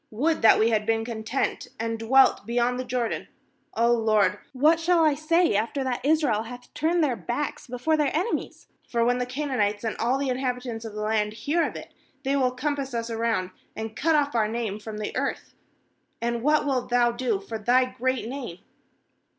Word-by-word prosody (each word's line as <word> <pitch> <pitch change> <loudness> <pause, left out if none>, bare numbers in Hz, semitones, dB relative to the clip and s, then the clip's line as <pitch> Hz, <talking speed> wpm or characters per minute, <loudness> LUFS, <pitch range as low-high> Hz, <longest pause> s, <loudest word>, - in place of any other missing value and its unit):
would 300 +9 0
that 225 - +7
we 225 +2 +3
had 215 -1 +2
been 225 +1 0
content 230 +2 -2
and 225 0 -2
dwelt 260 +4 +4
beyond 245 +1 +1
the - - -1
Jordan! 245 -2 -2 0.5
^h, 235 0 +3
Lord, 215 -2 +3
what 305 +5 +3
shall 335 0 +3
I 305 - +4
say, 330 +2 +2
after 230 +7 0
that 255 -2 -2
Israel 285 -7 +2
hath 245 +2 -10
turned 335 +2 +1
their 265 -5 +1
backs 285 +5 -4
before 250 +6 0
their 300 -2 +2
enemies! 370 +8 -3 0.3
9For 235 -1 +2
when 245 +1 +2
the 250 - -2
Canaanites 250 -7 -1
and 225 - -2
all 240 +4 +1
the 275 -1 -1
inhabitants 250 -3 -3
of 215 -2 -7
the 210 - -4
land 215 -1 0
hear 295 +10 0
of - - -3
it, - - -9 0.3
they 275 +1 +1
will 260 -2 +3
compass 270 0 -3
us 230 0 -3
round, 225 -5 -1 0.2
and 220 0 -5
cut 320 +4 +2
off 290 -1 +1
our 220 -3 +2
name 220 -2 -3
from 215 0 -7
the 210 - -4
earth; - - -3 0.7
and 235 0 -1
what 300 +3 +3
wilt 260 -3 -1
Thou 240 -1 +3
do 235 -4 -1
for 220 +3 -6
Thy 245 +4 +3
great 255 -1 -2
name?' 245 -9 -6
245 Hz, 195 wpm, -26 LUFS, 225-275 Hz, 0.7 s, that